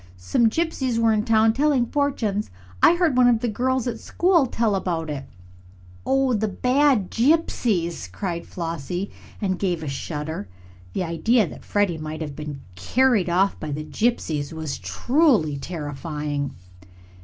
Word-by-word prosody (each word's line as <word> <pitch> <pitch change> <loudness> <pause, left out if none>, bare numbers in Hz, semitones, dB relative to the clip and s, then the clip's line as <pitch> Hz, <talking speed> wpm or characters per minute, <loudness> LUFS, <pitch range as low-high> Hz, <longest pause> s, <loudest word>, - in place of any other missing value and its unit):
"Some 90 - +2
gypsies 265 -4 -1
were 230 -1 +3
in 210 0 0
town, 220 -1 +4
telling 275 -1 +2
fortunes. 235 -7 -1 0.3
I 345 - +7
heard 345 -6 +2
one 250 -1 +6
of 235 -2 +3
the 245 - 0
girls 255 +3 0
at 230 -2 -3
school 345 -6 +2
tell 225 -3 0
about 170 -5 -2
it." 140 -2 -5 0.8
"Oh, 270 -1 +2
the 220 -1 +1
bad 250 -1 +2
gypsies!" 225 - +1
cried 170 - -4
Flossie, 170 +2 -4 0.3
and 190 -3 -1
gave 175 -5 -1
a - - -5
shudder. 150 - -4 0.5
The - - -1
idea 210 +7 +2
that - - -10
Freddie 200 -6 0
might 155 +1 -6
have 145 -3 -5
been 150 -2 -6
carried 220 - +2
off 190 +3 +2
by 155 - -5
the 150 +2 -3
gypsies 160 -10 -1
was 160 -3 -5
truly 245 - +2
terrifying. 145 -2 -4
200 Hz, 150 wpm, -23 LUFS, 155-245 Hz, 0.8 s, I